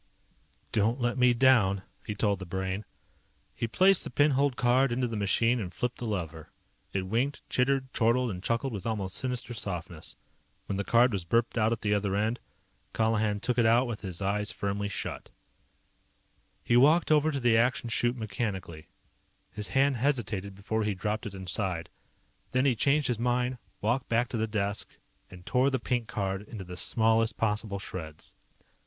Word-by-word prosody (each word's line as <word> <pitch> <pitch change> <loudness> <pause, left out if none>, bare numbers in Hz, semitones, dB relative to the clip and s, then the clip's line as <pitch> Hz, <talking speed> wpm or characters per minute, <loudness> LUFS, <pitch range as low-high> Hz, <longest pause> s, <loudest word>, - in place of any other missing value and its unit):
"Don't 115 +4 +1
let 120 -1 0
me 125 -1 +5
down," 115 -6 +4 0.2
he 105 - -5
told 100 -2 +1
the 95 - -6
Brain. 95 +3 -3 0.7
He 115 - -2
placed 190 +9 +4
the - - -5
pin 145 +1 +3
holed 140 -1 +2
card 125 +2 +3
into 125 +1 0
the 115 - -4
machine 115 +4 +2
and 95 -5 -4
flipped 125 +6 -3
the 120 - -4
lever. 80 -6 -4 0.4
It 95 - -1
winked, 120 +9 -1
chittered, 130 0 +1
chortled, 120 +1 +2
and 90 -2 -6
chuckled 115 +5 -1
with 100 +1 -5
almost 100 -4 -2
sinister 125 +1 -2
softness. 90 -6 -5 0.5
When 100 - -3
the 100 - -1
card 120 +3 +4
was 95 -3 -1
burped 115 +7 +1
out 110 -1 +2
at 115 - -2
the 105 -1 +1
other 100 -1 0
end, 110 +4 0 0.5
Colihan 110 -2 +1
took 125 -1 0
it 115 - +4
out 120 +3 +4
with 115 -4 -5
his 95 -1 -5
eyes 105 +2 0
firmly 100 0 -2
shut. 100 - -5 1.3
He 120 - +2
walked 155 +7 +5
over 155 0 +4
to 140 - -2
the 120 -3 +3
Action 120 +1 +2
Chute 120 +2 0
mechanically. 95 -8 -4 0.6
His 105 0 -3
hand 135 -1 +2
hesitated 115 -7 -1
before 110 +3 -2
he 105 -1 -1
dropped 105 +4 -2
it 100 - -8
inside. 95 -2 -3 0.6
Then 130 +2 +2
he 130 -3 +3
changed 140 +5 +2
his 120 -3 -1
mind, 125 +1 0 0.2
walked 120 +5 0
back 120 +2 +1
to 120 - -3
the 110 0 0
desk, 105 -1 -3 0.3
and 90 -1 -13
tore 130 +2 +3
the 135 - 0
pink 120 -1 -1
card 95 -1 -2
into 105 -1 -8
the 90 0 -8
smallest 110 +2 +2
possible 105 -2 -1
shreds. 80 -5 -7
110 Hz, 180 wpm, -29 LUFS, 100-125 Hz, 1.3 s, me